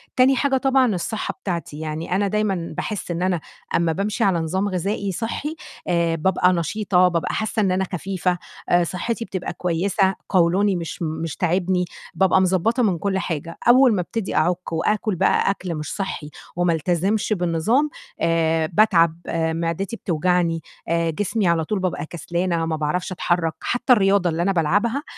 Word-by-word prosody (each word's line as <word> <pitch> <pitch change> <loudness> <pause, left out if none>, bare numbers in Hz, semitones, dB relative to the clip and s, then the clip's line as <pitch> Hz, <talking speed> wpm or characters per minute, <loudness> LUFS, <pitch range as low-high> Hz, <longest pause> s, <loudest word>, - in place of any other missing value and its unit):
تاني 260 +1 +5
حاجة 270 0 +2
طبعًا 260 -5 +3
الصحة 215 +5 -3
بتاعتي، 170 -5 -4
يعني 160 +3 -3
أنا 200 +1 +2
دايمًا 195 -4 -1
باحس 210 -4 -3
إن 170 +1 -3
أنا 185 -2 +1 0.4
أمّا 170 -1 +2
بامشي 200 +5 -1
على 185 -4 +3
نظام 185 +5 -1
غذائي 195 +2 -2
صحي، 240 - -3 0.3
آآ 170 -2 +1
بابقى 180 +2 +2
نشيطة، 180 +2 +2
بابقى 170 -2 -1
حاسّة 220 0 -1
إن 195 -3 +2
أنا 185 +1 +1
خفيفة، 180 0 -1 0.3
آآ 175 0 +4
صحتي 225 +7 -3
بتبقى 185 -4 -4
كويسة، 185 +3 +1
قولوني 185 +3 +3
مش 170 0 -5
م - - 0 0.2
مش 160 - -4
تاعبني، 180 +1 +1 0.3
بابقى 190 0 +3
مضبّطة 190 +7 +2
من 195 -6 +2
كلّ 190 +3 -1
حاجة، 165 -2 -4
أول 250 -2 +6
ما 180 - +1
أبتدي 220 +3 -4
أعُك 175 +2 0
وآكل 210 +4 0
بقى 175 - +2
أكل 180 -3 -4
مش 150 -1 -5
صحّي 190 -6 -4 0.3
وما 175 -1 +2
ألتزمش 185 +7 0
بالنظام، 195 - +1 0.3
آآ 165 -1 +2
باتعب، 170 -6 +4
آآ 160 -1 0
معدتي 170 +6 -2
بتوجعني، 175 -2 0 0.3
آآ 170 0 +1
جسمي 205 +4 -1
على 170 -1 +2
طول 210 +1 -1
بابقى 180 -5 -2
كسلانة، 170 +1 -2
ما 160 - -1
باعرفش 155 +5 -2
أتحرّك، 175 -2 0
حتّى 245 +1 +2
الرياضة 195 -4 +3
اللي 165 +1 -1
أنا 195 +3 +2
بالعبها، 205 - +1
180 Hz, 165 wpm, -22 LUFS, 165-205 Hz, 0.4 s, أول